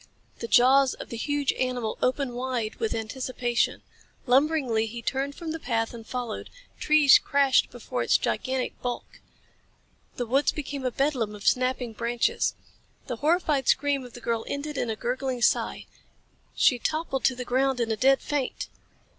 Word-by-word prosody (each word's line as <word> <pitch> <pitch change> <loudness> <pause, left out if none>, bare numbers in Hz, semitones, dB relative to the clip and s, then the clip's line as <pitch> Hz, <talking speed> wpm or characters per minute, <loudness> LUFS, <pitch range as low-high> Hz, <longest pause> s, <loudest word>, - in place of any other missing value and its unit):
The 230 - -4
jaws 260 +3 +5
of - - -9
the - - -5
huge 290 +3 0
animal 250 -3 -2
opened 255 0 0
wide 245 -3 -3
with 450 -1 -1
anticipation. 240 +1 -1 0.4
Lumberingly 260 -4 +2
he 235 +1 -7
turned 275 +3 -2
from 330 -2 -5
the 325 - -4
path 225 -4 -1
and 225 -2 -10
followed. 245 -3 -5 0.3
Trees 300 -2 +6
crashed 280 -2 +3
before - - -5
its - - +4
gigantic 260 -1 -2
bulk. 245 -1 -5 0.9
The 245 - -2
woods 270 +5 +2
became 280 -2 -5
a - - -1
bedlam 245 -5 0
of 205 - -11
snapping 255 -2 +1
branches. 235 +1 0 0.5
The 245 -3 -4
horrified 300 -2 +1
scream 280 -1 +2
of 245 -2 -11
the 245 - -10
girl 230 -1 -1
ended 290 +1 -4
in 245 - -1
a 220 - -1
gurgling 250 +1 -2
sigh. - - +1 0.7
She 250 -4 +4
toppled 310 -1 -2
to 260 - +3
the 250 0 -5
ground 260 +1 +1
in 230 -1 0
a - - +1
dead 270 +4 +3
faint. 285 -3 -3
255 Hz, 165 wpm, -26 LUFS, 240-280 Hz, 0.9 s, Trees